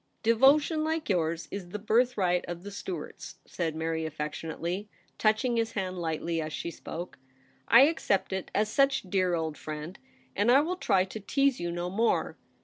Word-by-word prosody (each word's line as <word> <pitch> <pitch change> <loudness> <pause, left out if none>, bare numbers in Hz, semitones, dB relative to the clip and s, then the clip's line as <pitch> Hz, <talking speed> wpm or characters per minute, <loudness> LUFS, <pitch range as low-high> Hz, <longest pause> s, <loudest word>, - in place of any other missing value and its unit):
' - - -44
Devotion 290 +6 +4
like 315 -2 -2
yours 165 -3 0
is 190 -3 -6
the 210 - -4
birthright 210 -5 +2
of 175 0 -6
the 205 - -7
Stuarts,' 185 -5 -7
said 165 -3 -3
Mary 160 0 -2
affectionately, 160 +5 -4 0.3
touching 230 +3 +2
his 225 0 0
hand 185 -2 -3
lightly 165 0 -2
as 155 0 -4
she 170 - -4
spoke. 170 -1 -8 0.3
* - - -35
I 235 - +8
accept 275 - +2
it 190 -1 -3
as 210 +1 +2
such, 275 +4 +2
dear 185 -2 +1
old 160 -2 -3
friend, 155 +4 -6 0.4
and 205 +4 +2
I 260 +3 +7
will 355 +4 -2
try 185 - +2
to 195 +3 -7
tease 275 +5 +1
you 175 0 -2
no 175 +1 -3
more. 225 +4 +1
190 Hz, 180 wpm, -29 LUFS, 170-230 Hz, 0.4 s, I